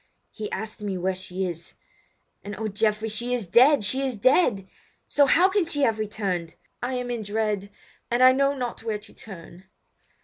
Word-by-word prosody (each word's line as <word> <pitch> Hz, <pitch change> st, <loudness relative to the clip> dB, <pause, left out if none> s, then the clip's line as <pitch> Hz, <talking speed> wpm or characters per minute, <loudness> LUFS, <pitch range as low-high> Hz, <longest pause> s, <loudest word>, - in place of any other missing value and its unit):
He 215 Hz, -2 st, -6 dB
asked 215 Hz, +2 st, -5 dB
me 200 Hz, -3 st, -3 dB
where 185 Hz, +1 st, 0 dB
she 185 Hz, 0 st, -3 dB
is—and 175 Hz, +3 st, -10 dB
oh, 220 Hz, +1 st, -2 dB
Geoffrey, 215 Hz, +1 st, 0 dB
she 235 Hz, +3 st, -1 dB
is 235 Hz, -5 st, -3 dB
dead, 255 Hz, -, +5 dB
she 260 Hz, +7 st, +1 dB
is 265 Hz, -3 st, -1 dB
dead! 225 Hz, -, +3 dB, 0.4 s
So 285 Hz, -1 st, +3 dB
how 350 Hz, +7 st, +5 dB
can 395 Hz, 0 st, +1 dB
she 290 Hz, -3 st, 0 dB
have 225 Hz, -4 st, +2 dB
returned? 195 Hz, -6 st, -3 dB, 0.3 s
Oh! 245 Hz, -, -1 dB
I 260 Hz, -, -3 dB
am 250 Hz, -1 st, -3 dB
in 235 Hz, -2 st, -3 dB
dread, 210 Hz, -1 st, -2 dB, 0.4 s
and 240 Hz, +2 st, +2 dB
I 255 Hz, -, +9 dB
know 275 Hz, +2 st, +2 dB
not 250 Hz, -3 st, -4 dB
where 220 Hz, -2 st, -2 dB
to 210 Hz, -, -15 dB
turn!" 185 Hz, -2 st, -12 dB
220 Hz, 190 wpm, -25 LUFS, 195-255 Hz, 0.4 s, I